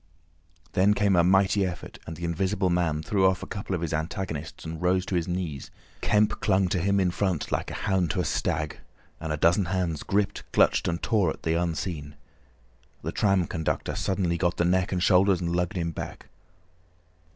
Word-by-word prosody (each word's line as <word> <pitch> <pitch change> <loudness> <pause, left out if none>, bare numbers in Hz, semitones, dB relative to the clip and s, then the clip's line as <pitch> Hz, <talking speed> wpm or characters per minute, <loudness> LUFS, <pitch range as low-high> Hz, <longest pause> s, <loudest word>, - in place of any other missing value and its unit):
Then 100 +3 +3
came 100 -2 +3
a 85 - +5
mighty 95 +2 +3
effort, 90 -2 -5
and 80 - -5
the 85 - -4
Invisible 95 +3 0
Man 80 -3 0
threw 95 0 +3
off 95 -1 0
a - - -4
couple 100 -1 -4
of 85 - -3
his 85 -1 -2
antagonists 80 -2 -4
and 80 0 -6
rose 90 +1 +2
to - - -5
his 85 -2 0
knees. 90 -6 -4 0.3
Kemp 105 0 +2
clung 95 -2 +2
to 90 - 0
him 100 +3 +2
in 90 -2 +2
front 95 -3 -1
like - - -1
a - - -6
hound 95 -3 0
to - - -1
a - - 0
stag, 75 -1 -1 0.4
and 80 -1 -4
a 75 - -1
dozen 85 +5 +3
hands 85 -3 -1
gripped, 100 0 -1
clutched, - - +3
and 85 0 -2
tore 105 -7 +2
at - - -6
the 80 - +1
Unseen. 80 -3 -2 0.9
The - - -2
tram 95 -3 +2
conductor 80 0 -2
suddenly 90 -3 0
got 85 -2 +1
the 85 - +2
neck 90 +1 +2
and 90 -2 0
shoulders 95 -1 +4
and 85 -1 -1
lugged 90 +1 -1
him 85 -1 -1
back. - - -7
90 Hz, 195 wpm, -26 LUFS, 85-95 Hz, 0.9 s, a